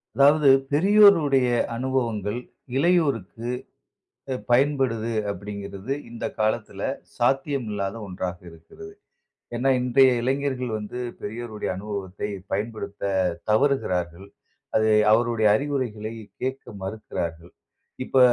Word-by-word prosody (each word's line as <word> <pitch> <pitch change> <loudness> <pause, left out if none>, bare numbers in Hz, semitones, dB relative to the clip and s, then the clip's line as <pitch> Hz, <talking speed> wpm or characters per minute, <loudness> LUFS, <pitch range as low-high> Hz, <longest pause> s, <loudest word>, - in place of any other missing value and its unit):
"அதாவது 145 +1 +6 0.2
பெரியோருடைய 165 -6 +5 0.3
அனுபவங்கள். 115 -4 -1 0.4
இளையோருக்கு 140 - +1 1.0
பயன்படுது" 125 -4 +2 0.2
அப்படிங்கிறது 100 +3 -5 0.2
இந்த 115 0 -5
காலத்தில 110 0 -1 0.4
சாத்தியம் 135 -2 +1
இல்லாத 100 0 -2
ஒன்றாக 90 -1 -4
இருக்கிறது. 85 - -13 0.6
ஏன்னா 130 +3 +1
இன்றைய 130 +1 +5
இளைஞர்கள் 130 -1 -1
வந்து, 105 +3 -6 0.2
பெரியோருடைய 110 0 -5
அனுபவத்தை 100 -1 -5 0.2
பயன்படுத்த 105 0 -4 0.5
தவறுகிறார்கள். 95 - +1 0.5
அது 110 0 +4 0.2
அவருடைய 115 -1 +3
அறிவுரைகளை 120 -5 -2 0.3
கேட்க 130 +1 -3 0.2
மறுக்கிறார்கள். 85 -5 -5 0.5
இப்ப 135 - -1
115 Hz, 85 wpm, -25 LUFS, 105-135 Hz, 1.0 s, அதாவது